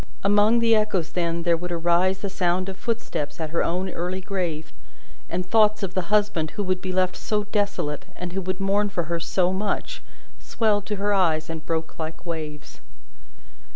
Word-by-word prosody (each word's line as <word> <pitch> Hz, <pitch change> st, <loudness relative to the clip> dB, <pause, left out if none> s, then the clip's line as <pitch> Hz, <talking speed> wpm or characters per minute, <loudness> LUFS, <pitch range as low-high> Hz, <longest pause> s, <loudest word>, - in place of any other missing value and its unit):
Among 205 Hz, +3 st, +5 dB
the 230 Hz, -1 st, +5 dB
echoes 210 Hz, -6 st, +1 dB
then, 170 Hz, -1 st, -1 dB
there 170 Hz, -1 st, +4 dB
would 175 Hz, +2 st, -5 dB
arise 175 Hz, +3 st, +2 dB
the 200 Hz, -, -2 dB
sound 185 Hz, 0 st, +1 dB
of 190 Hz, -, -7 dB
footsteps 195 Hz, -11 st, -3 dB
at 160 Hz, -2 st, -3 dB
her 170 Hz, -, +1 dB
own 180 Hz, +3 st, 0 dB
early 180 Hz, +1 st, -3 dB
grave; 180 Hz, -5 st, -3 dB, 0.6 s
and 180 Hz, +2 st, -2 dB
thoughts 215 Hz, +1 st, +4 dB
of 185 Hz, -2 st, -2 dB
the 185 Hz, -2 st, -2 dB
husband 205 Hz, -7 st, +2 dB
who 205 Hz, -, 0 dB
would 185 Hz, -1 st, 0 dB
be 185 Hz, -, -3 dB
left 185 Hz, 0 st, +1 dB
so 210 Hz, -1 st, -1 dB
desolate, 200 Hz, -8 st, -1 dB
and 180 Hz, -1 st, -5 dB
who 195 Hz, -, -1 dB
would 185 Hz, +1 st, -3 dB
mourn 200 Hz, +1 st, +2 dB
for 175 Hz, -3 st, -1 dB
her 170 Hz, +1 st, -2 dB
so 180 Hz, +2 st, +1 dB
much, 210 Hz, -, -2 dB, 0.4 s
swelled 210 Hz, -3 st, 0 dB
to 210 Hz, -, -1 dB
her 205 Hz, +1 st, +1 dB
eyes, 165 Hz, -4 st, +2 dB
and 160 Hz, -1 st, -6 dB
broke 160 Hz, 0 st, -2 dB
like 160 Hz, +1 st, -5 dB
waves. 155 Hz, -3 st, -6 dB
185 Hz, 190 wpm, -25 LUFS, 170-205 Hz, 0.6 s, Among